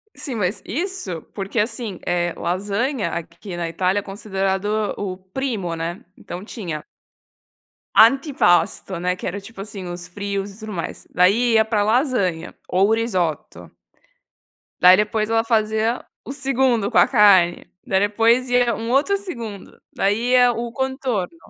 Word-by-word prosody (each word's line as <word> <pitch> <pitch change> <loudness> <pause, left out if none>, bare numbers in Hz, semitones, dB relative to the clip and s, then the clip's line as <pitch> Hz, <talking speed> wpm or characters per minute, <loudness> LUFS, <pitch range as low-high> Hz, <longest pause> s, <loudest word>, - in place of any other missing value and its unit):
Sim, 270 - -5
mas 205 -1 -1
isso 285 - -3
porque, 195 +3 -4
assim, 220 -3 -2
eh, 175 -1 0
lasanha 205 - -1
aqui 170 +2 -6
na 170 -1 -2
Itália 185 +4 0
é - - -12
considerado 195 -1 -2 0.3
o 200 -2 -3
o - - -8
primo 190 -2 -4
né, 165 +2 -5
então 180 +2 -8
tinha 175 -9 -6 1.1
antipasto 230 - +4
né, 180 +1 0
que 180 - -8
era 190 +3 -3
tipo 200 0 -12
assim, 200 -1 -7
os 175 0 -6
frios 200 +1 -4
e 195 - -16
tudo 215 0 -7
mais, 170 -4 -5
daí 210 +7 +4
ia 220 0 +5
para 220 -2 0
lasanha 215 - 0
ou 190 +3 +2
risoto. 185 -9 -2 1.1
Daí 180 +1 +8
depois 215 +1 0
ela 225 0 +2
fazia 220 +1 0 0.2
o - - -6
segundo 265 -6 +1
com - - +3
a - - +7
carne, 200 -7 +5 0.2
daí 190 - +2
depois 230 +5 +3
ia 245 -1 +3
um 230 +1 -4
outro 285 +10 +3
segundo, 235 - -8
daí 215 +5 0
ia 250 -1 +6
o 235 0 -4
contorno. 265 - -2
205 Hz, 150 wpm, -21 LUFS, 185-235 Hz, 1.1 s, Daí